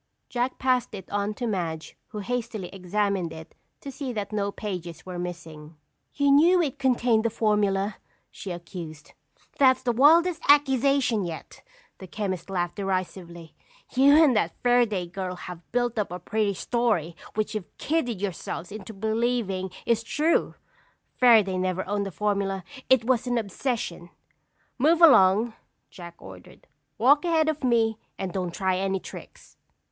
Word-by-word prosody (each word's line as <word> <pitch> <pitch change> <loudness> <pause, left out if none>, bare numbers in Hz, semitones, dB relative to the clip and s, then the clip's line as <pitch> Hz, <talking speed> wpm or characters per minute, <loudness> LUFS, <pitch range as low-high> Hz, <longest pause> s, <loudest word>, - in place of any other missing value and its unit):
Jack 245 +1 -2
passed 255 -3 0
it 190 -2 -9
on 205 +1 -1
to 245 - -4
Madge 170 -7 -3
who - - -9
hastily 220 -4 -4
examined 195 -1 -1
it 160 0 -11 0.3
to 275 - -7
see 270 -1 -5
that 210 -3 -4
no 200 -1 -1
pages 175 -6 -6
were 180 -1 -6
missing. 165 -3 -8 0.4
"You 285 -1 +3
knew 335 +6 +6
it 295 -4 -1
contained 245 -4 +2
the 230 - +1
formula," 210 -2 0 0.3
she 200 - -8
accused. 170 -3 -8 0.5
"That's 260 -2 +4
the 245 - +1
wildest 320 +7 +4
accusation 275 -5 +3
yet!" 165 -2 -8 0.4
the 190 - -9
chemist 190 -2 -4
laughed 175 -1 -2
derisively. 185 -4 -4 0.4
"You 275 +2 +6
and 270 -6 +4
that 175 -6 0
Fairaday 240 -7 +2
girl 185 +1 -5
have 175 -1 -10
built 240 -1 0
up 205 - -2
a 180 - -4
pretty 205 +2 -1
story 210 -9 0 0.2
which 215 0 -1
you've 210 -4 -7
kidded 255 - -1
yourselves 180 -2 -5
into 215 +1 -8
believing 220 -3 -1 0.2
is 230 -1 +2
true. 300 +8 0 0.7
Fairaday 215 -7 +5
never 185 0 -2
owned 200 0 -1
a - - -6
formula. 200 -1 -1 0.3
It 260 -3 +5
was 250 -1 +1
an 245 0 0
obsession." 205 -5 -3 0.7
"Move 320 +6 +4
along!" 220 - +6 0.4
Jack 170 -2 -10
ordered. 95 -1 -14 0.3
"Walk 285 +7 +4
ahead 325 -3 +2
of 310 -2 -2
me 225 -3 +2 0.2
and 185 -2 -4
don't 180 -2 -2
try 185 +1 0
any 195 0 -1
tricks." - - -12
210 Hz, 150 wpm, -26 LUFS, 185-245 Hz, 0.7 s, knew